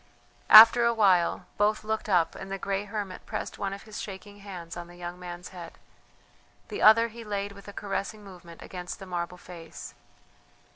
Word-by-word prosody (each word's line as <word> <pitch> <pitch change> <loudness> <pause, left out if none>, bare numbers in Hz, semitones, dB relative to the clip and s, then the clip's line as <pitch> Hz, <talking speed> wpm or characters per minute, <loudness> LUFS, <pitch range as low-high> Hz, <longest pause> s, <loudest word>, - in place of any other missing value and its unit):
After 225 +2 +10
a 235 0 +2
while 190 -6 +2
both 210 +1 +2
looked 220 0 -3
up 175 -4 +2
and 195 0 -9
the 195 - -2
grey 195 +1 -3
hermit 205 -3 -6
pressed - - -5
one 195 - -2
of 200 0 -8
his 215 -1 -8
shaking 205 +1 -9
hands 180 -4 -9
on 175 0 -7
the 175 - -14
young 175 0 -8
man's 180 0 -8
head; 175 -3 -11 0.9
the - - -5
other 230 +2 +6
he 230 +1 -10
laid 205 -1 -4
with 200 0 -14
a - - -7
caressing 205 +1 -5
movement 175 -4 -13
against 180 -1 -7
the 195 - -10
marble 175 -1 -4
face. 170 -2 -11
195 Hz, 185 wpm, -27 LUFS, 180-210 Hz, 0.9 s, After